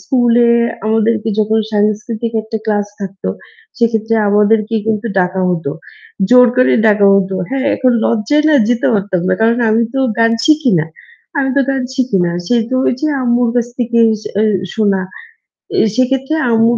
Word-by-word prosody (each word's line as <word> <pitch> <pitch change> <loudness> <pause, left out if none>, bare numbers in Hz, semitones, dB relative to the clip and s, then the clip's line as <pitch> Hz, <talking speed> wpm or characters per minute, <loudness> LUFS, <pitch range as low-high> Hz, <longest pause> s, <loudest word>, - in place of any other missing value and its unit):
স্কুলে 240 -2 +2 0.4
আমাদেরকে 220 0 0
যখন 215 +1 +1
সাংস্কৃতিক 215 +2 -1
একটা 220 0 -5
ক্লাস 205 -1 -1
থাকতো 195 - -6 0.5
সেক্ষেত্রে 225 -1 0
আমাদেরকে 210 +2 +2
কিন্তু 220 0 -1
ডাকা 185 +1 0
হত। 165 -4 -3 0.6
জোর 250 0 +7
করে 255 - +3
ডাকা 205 -2 +4
হত। 195 -1 +1 0.2
হ্যাঁ, 270 +1 -2
এখন 255 -2 +2
লজ্জায় 235 +7 +1
না 310 - +3
যেতে 245 0 0
পারতাম 195 -3 -1
না। 185 - +2
কারণ 230 +2 +2
আমি 225 +2 +2
তো 270 - 0 0.2
গান 230 0 +3
শিখি 305 -5 +3
না। 155 - -1 0.5
আমি 270 -1 0
তো - - +4
গান 270 -1 -1
শিখি 255 -7 0
না। 170 - -1 0.2
সে 245 - +1
তো 260 - 0
ওইযে 255 +5 -1 0.2
আম্মুর 240 -1 +1
কাছ 240 -1 +1
থেকে 235 -1 0 0.4
এ - - +3 0.3
শোনা। 200 -3 +1 0.8
এ - - +3 0.2
সেক্ষেত্রে 270 +3 0 0.2
আম্মুর 230 +1 +2
225 Hz, 160 wpm, -14 LUFS, 210-245 Hz, 0.8 s, জোর